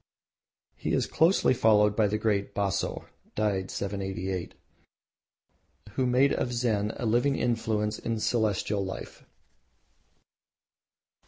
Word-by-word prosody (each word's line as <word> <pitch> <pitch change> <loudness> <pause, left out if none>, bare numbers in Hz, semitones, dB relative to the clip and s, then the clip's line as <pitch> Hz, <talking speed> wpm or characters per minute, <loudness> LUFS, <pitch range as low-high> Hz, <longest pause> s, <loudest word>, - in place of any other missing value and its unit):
He - - -3
is - - +2
closely 165 -3 +3
followed 105 -3 +4
by 110 -1 +3
the 105 +1 -1
great 105 -2 -1
Baso(died 100 0 -2
788) 95 -2 -4 1.4
who 130 +4 0
made 130 +3 +3
of 125 - -1
Zen 110 -4 0
a - - -4
living 120 +5 +2
influence 110 -3 -1
in 115 -1 -2
Celestial 105 -3 0
life. 95 0 -7
105 Hz, 100 wpm, -28 LUFS, 100-120 Hz, 1.4 s, followed